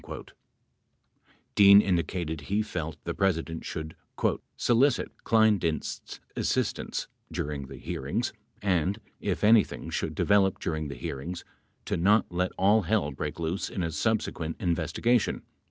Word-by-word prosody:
27 - - -9 1.2
Dean 100 0 +9
indicated 85 -4 0
he 100 +8 0
felt 80 -7 -4
the - - -3
President 80 -4 0
should 80 0 -5 0.6
"solicit 125 +3 +3
Kleindienst's 105 -8 +1 0.2
assistance - - -1 0.2
during 75 -4 -3
the - - -9
hearings - - -3 0.3
and, 95 +1 +1 0.2
if - - -2
anything 110 0 +4
should - - -2
develop 100 -2 +3
during 80 -2 -2
the 70 - -6
hearings, 85 +6 -5 0.4
to - - -1
not 100 +5 +4
let 90 +1 0
all 105 +4 +4
hell 90 -5 +1
break 70 - -5
loose 85 +4 -2
in 95 - -3
a 85 - -1
subsequent 80 -3 -1
investigation." 90 +7 +1
90 Hz, 125 wpm, -28 LUFS, 80-105 Hz, 1.2 s, Dean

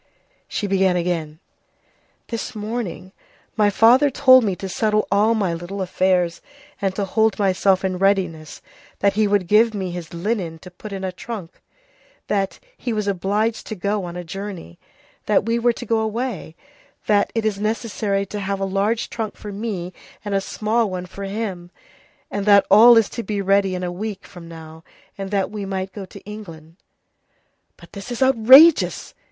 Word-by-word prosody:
She - - -3
began 190 -2 +2
again:— 170 -3 -2 0.9
"This 230 +1 -5
morning 210 -3 -5 0.4
my 210 -2 +3
father 240 +8 +5
told 255 -1 +6
me 195 -4 0
to 195 - -6
settle 215 +2 0
all 210 +3 +3
my 195 -6 0
little 175 +4 -6
affairs 185 -2 0 0.4
and 195 -1 -1
to 200 - -1
hold 220 +2 +1
myself 195 -1 +2
in 185 -1 -2
readiness, 185 -6 0 0.3
that 200 0 +2
he 215 +1 +2
would 200 -2 +1
give 215 +4 +3
me 190 -3 -3
his 175 -2 -7
linen 175 -2 -3
to 180 - -10
put 205 +4 -10
in 195 -1 -5
a 190 - -2
trunk, 190 -2 -8 0.7
that 195 -2 -1 0.2
he 245 - -4
was 210 -1 -2
obliged 205 +4 -1
to 220 - -5
go 200 0 -2
on 175 0 -7
a 180 - -5
journey, 180 - -8 0.5
that - - +2
we 230 +1 0
were 240 0 +2
to - - -8
go 225 -1 +1
away, 220 -6 -3 0.5
that 205 -1 +2
it 225 -1 -1
is 205 -2 -1
necessary 215 -2 -1
to 205 +2 -6
have 195 0 -3
a 195 - -1
large 200 +4 0
trunk 225 -2 -5
for 210 - -8
me 195 -4 -5 0.3
and 205 - -3
a 195 - +1
small 220 +2 -1
one 180 -1 -5
for 195 +2 -8
him, 195 -4 -5 0.6
and 200 0 -3
that 200 -1 +6
all 230 +4 +8
is 225 -3 +4
to 235 - -5
be 210 -3 -3
ready 195 -1 +2
in 180 - -4
a 175 - -2
week 200 +2 -6
from 175 -2 -12
now, 160 -1 -11 0.3
and 195 -1 -6
that 195 -1 -1
we 210 -1 -5
might 190 -1 -4
go 200 -2 -7
to 195 +1 -13
England." 170 -6 -11 1.0
"But - - -17
this 200 +4 -8
is 240 +2 0
outrageous!" 265 +6 +6
200 Hz, 180 wpm, -21 LUFS, 185-220 Hz, 1.0 s, all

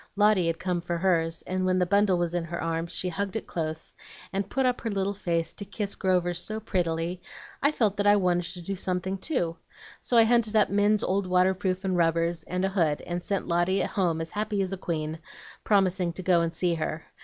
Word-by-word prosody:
Lotty 205 -4 +4
had 165 0 0
come 180 -1 -2
for 175 0 -2
hers, 165 -2 +1
and 185 0 -2
when 185 0 +2
the 180 - +3
bundle 200 0 +3
was 175 -1 -1
in 175 -1 0
her 170 +1 -5
arms 165 +1 -2
she 180 - -1
hugged 200 +3 -3
it 225 - -3
close, 160 -1 -4 0.4
and 195 0 -2
put 265 -1 0
up 250 -1 +1
her 230 - -2
little 200 -1 -1
face 170 -4 -1
to - - -6
kiss 200 0 -3
Grover 180 -3 +1
so 215 +5 -3
prettily, 175 -3 -2 0.4
I 285 - +4
felt 220 -9 +1
that 205 0 +1
I 205 - +7
wanted 180 -3 +1
to 180 - -8
do 195 +3 -3
something 185 +1 -2
too. 175 - -1 0.4
So 240 - +1
I 230 - +8
hunted 225 -1 +2
up 210 -2 +4
Min's 205 +1 +3
old 190 0 0
waterproof 185 +1 +1
and 185 -1 +1
rubbers, 170 0 +1
and 180 +1 -1
a - - +1
hood, 165 -6 +1
and 175 0 -4
sent 200 -1 -2
Lotty 175 +3 +2
home 170 -5 0
as 165 - -5
happy 210 0 -2
as 190 0 -3
a - - 0
queen, 160 -3 -3 0.4
promising 190 -4 +2
to 185 - -6
go 175 -2 +4
and 165 0 0
see 175 +1 0
her. 160 0 -3
185 Hz, 225 wpm, -27 LUFS, 170-200 Hz, 0.4 s, I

